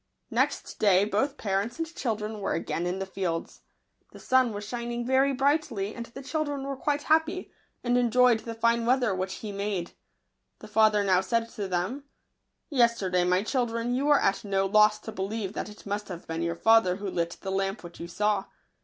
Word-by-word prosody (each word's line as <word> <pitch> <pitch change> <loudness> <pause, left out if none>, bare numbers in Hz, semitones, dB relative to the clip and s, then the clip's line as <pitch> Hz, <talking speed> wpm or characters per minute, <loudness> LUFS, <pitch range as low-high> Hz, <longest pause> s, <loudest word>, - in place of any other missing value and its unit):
Next - - -1
day 200 -2 +5
both 265 +8 0
parents 205 +5 -1
and 330 - -1
children 215 -3 -3
were 200 - -1
again 170 +1 -2
in 180 +1 -2
the 195 - -3
fields. 185 -3 -4 0.5
The - - -11
sun 255 -2 +3
was 205 0 -5
shining 240 0 -4
very 265 +2 +3
brightly, 270 -7 0
and 235 -1 -7
the 270 +4 -10
children 290 -1 -2
were 275 0 -3
quite 290 +2 -1
happy, 320 +3 +1 0.3
and 245 0 +1
enjoyed 245 -1 +4
the 230 0 -7
fine 230 +1 +2
weather 245 -4 +3
which 185 0 -3
he 210 +1 -6
made. 200 -3 -3 0.7
The - - -12
father 215 -1 +4
now 185 -2 +3
said 230 +4 -1
to 205 -3 -5
them, 190 +10 -2 0.3
" - - -52 0.3
Yester 235 -8 +2
day, 180 -1 +3
my 180 +2 +2
children, 235 0 -1
you 270 +3 0
were 290 -1 +6
at 195 - +1
no 195 -1 0
loss 210 +1 +5
to 220 - -7
believe 200 0 -3
that - - -4
it 210 - -14
must 205 +1 -3
have 180 -3 -8
been 165 0 -4
your 170 0 -1
father 225 -2 +4
who 200 +1 -5
lit 170 -2 -2
the 190 - -4
lamp 195 +2 -1
which 175 0 -11
you 170 - -6
saw. 205 +2 0
215 Hz, 200 wpm, -27 LUFS, 195-245 Hz, 0.7 s, were